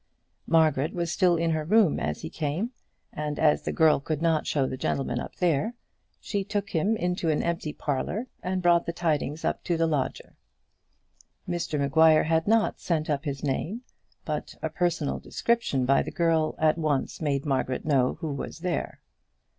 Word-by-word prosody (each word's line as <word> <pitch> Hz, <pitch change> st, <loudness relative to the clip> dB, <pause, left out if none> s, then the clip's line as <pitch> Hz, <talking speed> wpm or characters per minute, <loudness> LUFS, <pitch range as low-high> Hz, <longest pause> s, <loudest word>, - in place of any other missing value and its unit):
Margaret 155 Hz, -2 st, +3 dB
was 170 Hz, -2 st, -1 dB
still 175 Hz, -1 st, +3 dB
in 165 Hz, 0 st, +1 dB
her 155 Hz, -1 st, 0 dB
room 205 Hz, +1 st, +3 dB
as 75 Hz, 0 st, -3 dB
he -, -, -4 dB
came, 165 Hz, -, -2 dB, 0.4 s
and 150 Hz, -1 st, -3 dB
as 150 Hz, -2 st, +3 dB
the -, -, -3 dB
girl 160 Hz, -3 st, +4 dB
could 150 Hz, +1 st, -3 dB
not 165 Hz, -2 st, +1 dB
show 140 Hz, -3 st, +1 dB
the 130 Hz, -, -3 dB
gentleman 130 Hz, -1 st, -1 dB
up -, -, -7 dB
there, 180 Hz, -, +1 dB, 0.4 s
she 200 Hz, -2 st, -2 dB
took 205 Hz, 0 st, -3 dB
him 200 Hz, +7 st, +1 dB
into 180 Hz, -3 st, -1 dB
an 155 Hz, -, +1 dB
empty 170 Hz, -2 st, -2 dB
parlour, 150 Hz, -, -2 dB, 0.2 s
and 185 Hz, 0 st, -2 dB
brought 175 Hz, -1 st, +4 dB
the 170 Hz, -, -2 dB
tidings 155 Hz, -3 st, -1 dB
up -, -, -1 dB
to 170 Hz, -, 0 dB
the 165 Hz, -, +2 dB
lodger. 150 Hz, -5 st, -2 dB, 1.1 s
Mr 175 Hz, -3 st, -2 dB
Maguire 155 Hz, +3 st, +5 dB
had 160 Hz, +2 st, +1 dB
not 225 Hz, 0 st, +2 dB
sent 155 Hz, -3 st, -1 dB
up 145 Hz, +1 st, -1 dB
his 140 Hz, -1 st, -4 dB
name; 165 Hz, -, -2 dB, 0.4 s
but -, -, -4 dB
a -, -, -1 dB
personal 170 Hz, -5 st, -1 dB
description 230 Hz, -, 0 dB
by 135 Hz, +2 st, +4 dB
the -, -, -4 dB
girl 165 Hz, -2 st, +1 dB
at 155 Hz, +1 st, +2 dB
once 150 Hz, -2 st, -1 dB
made 140 Hz, -2 st, 0 dB
Margaret 130 Hz, -2 st, -1 dB
know 135 Hz, -4 st, +2 dB
who 155 Hz, -4 st, -2 dB
was 140 Hz, +4 st, -6 dB
there. 180 Hz, -1 st, -3 dB
160 Hz, 180 wpm, -27 LUFS, 145-175 Hz, 1.1 s, Maguire